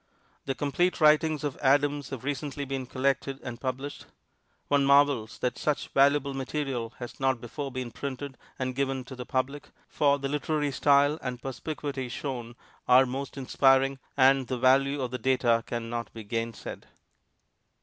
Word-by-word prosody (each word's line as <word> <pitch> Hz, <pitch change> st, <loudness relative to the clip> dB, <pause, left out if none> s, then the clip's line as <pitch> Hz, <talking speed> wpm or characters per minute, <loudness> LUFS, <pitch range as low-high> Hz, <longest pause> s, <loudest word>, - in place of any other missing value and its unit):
The 135 Hz, -, -2 dB
complete 175 Hz, +7 st, 0 dB
writings 155 Hz, -1 st, +4 dB
of 145 Hz, -3 st, -3 dB
Adams 145 Hz, +1 st, +2 dB
have 130 Hz, -3 st, -6 dB
recently 145 Hz, 0 st, -3 dB
been 135 Hz, -1 st, -4 dB
collected 135 Hz, +1 st, -1 dB
and 120 Hz, -1 st, -7 dB
published. 135 Hz, +2 st, -4 dB, 0.6 s
One 145 Hz, -1 st, +3 dB
marvels 140 Hz, -5 st, +3 dB
that 125 Hz, 0 st, -2 dB
such 150 Hz, -2 st, -1 dB
valuable 140 Hz, 0 st, +3 dB
material 135 Hz, -4 st, -3 dB
has 120 Hz, -1 st, -8 dB
not 135 Hz, -2 st, +1 dB
before 135 Hz, +4 st, -6 dB
been 130 Hz, -2 st, -5 dB
printed 140 Hz, +1 st, -5 dB, 0.2 s
and 130 Hz, -1 st, -2 dB
given 135 Hz, 0 st, -1 dB
to 130 Hz, +1 st, -10 dB
the 125 Hz, -1 st, -8 dB
public, 135 Hz, +3 st, -2 dB, 0.2 s
for 145 Hz, -1 st, +2 dB
the 140 Hz, -1 st, -3 dB
literary 150 Hz, 0 st, -1 dB
style 145 Hz, +2 st, +3 dB
and 125 Hz, -1 st, -4 dB
perspicuity 135 Hz, 0 st, -5 dB
shown 120 Hz, -3 st, -5 dB, 0.3 s
are 125 Hz, +1 st, +7 dB
most 135 Hz, +2 st, -5 dB
inspiring, 135 Hz, 0 st, +3 dB, 0.2 s
and 135 Hz, -1 st, +5 dB
the 130 Hz, -, -2 dB
value 135 Hz, +3 st, +3 dB
of 125 Hz, -2 st, -2 dB
the 125 Hz, -, -4 dB
data 120 Hz, -2 st, +2 dB
can 120 Hz, -1 st, -3 dB
not 120 Hz, 0 st, -4 dB
be 110 Hz, -, -7 dB
gainsaid. 115 Hz, +1 st, -5 dB
135 Hz, 160 wpm, -28 LUFS, 125-140 Hz, 0.6 s, are